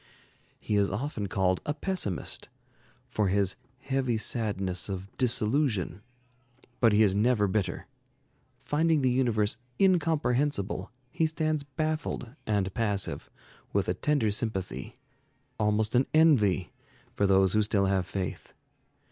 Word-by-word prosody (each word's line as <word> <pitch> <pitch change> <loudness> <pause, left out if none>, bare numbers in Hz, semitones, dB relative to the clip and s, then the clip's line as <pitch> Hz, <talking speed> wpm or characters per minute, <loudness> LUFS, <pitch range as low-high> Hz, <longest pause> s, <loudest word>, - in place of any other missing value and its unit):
He 105 - -1
is 100 -1 +3
often 110 -1 -3
called 95 -1 +1
a 150 - -2
pessimist, 155 - -3 0.6
for 105 -2 0
his 95 0 +1 0.3
"heavy 135 -3 0
sadness 100 -6 -2
of 95 0 -6
disillusion"; 115 - +1 0.8
but 115 -3 +5
he 105 +1 +5
is 100 -3 +3
never 105 0 +2
bitter. 95 -3 -2 0.8
Finding 155 -1 +2
the 130 - +3
universe 110 -4 +1 0.2
incomprehensible, 145 - +1 0.2
he 160 - +1
stands 155 -1 -1
baffled 150 -4 -3
and 100 -3 0
passive, 105 -5 -1 0.4
with - - +1
a - - +1
tender 145 -8 +1
sympathy, 100 -3 -3 0.6
almost 105 0 +1
an 130 +2 +3
envy, 110 - +4 0.4
for 100 - +1
those 95 -1 +4
who 110 - +4
still 100 -1 +2
have 95 -2 +1
faith. 95 -4 -5
110 Hz, 120 wpm, -28 LUFS, 100-140 Hz, 0.8 s, but